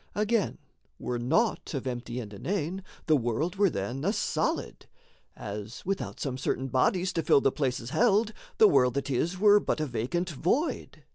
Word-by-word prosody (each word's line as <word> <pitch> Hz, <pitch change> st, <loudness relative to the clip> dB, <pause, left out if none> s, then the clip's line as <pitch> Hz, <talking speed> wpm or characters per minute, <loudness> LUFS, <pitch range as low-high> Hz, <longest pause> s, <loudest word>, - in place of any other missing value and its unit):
Again, 210 Hz, 0 st, +1 dB, 0.4 s
were 120 Hz, -1 st, -3 dB
naught 165 Hz, -, 0 dB
of 135 Hz, -, -3 dB
empty 120 Hz, -1 st, -4 dB
and 105 Hz, -4 st, -7 dB
inane, 180 Hz, -, -3 dB, 0.2 s
The 155 Hz, -, +4 dB
world 140 Hz, -, -1 dB
were 200 Hz, -1 st, +4 dB
then 120 Hz, -, -4 dB
a 195 Hz, -, +2 dB
solid; 210 Hz, -, -2 dB, 0.5 s
as, 105 Hz, +2 st, -7 dB
without 195 Hz, +1 st, -3 dB
Some 130 Hz, -3 st, -3 dB
certain 135 Hz, 0 st, -1 dB
bodies 180 Hz, +8 st, +1 dB
to 165 Hz, -, 0 dB
fill 150 Hz, -, +5 dB
the 135 Hz, -, +3 dB
places 130 Hz, -4 st, -2 dB
held, 220 Hz, -1 st, +3 dB, 0.2 s
The 440 Hz, -, +8 dB
world 125 Hz, -, +3 dB
that 140 Hz, 0 st, -2 dB
is 170 Hz, +8 st, 0 dB
were 205 Hz, +1 st, +6 dB
but 200 Hz, -, -1 dB
a 155 Hz, -, 0 dB
vacant 145 Hz, +9 st, -2 dB
void. 185 Hz, -, -1 dB
155 Hz, 170 wpm, -28 LUFS, 125-195 Hz, 0.5 s, The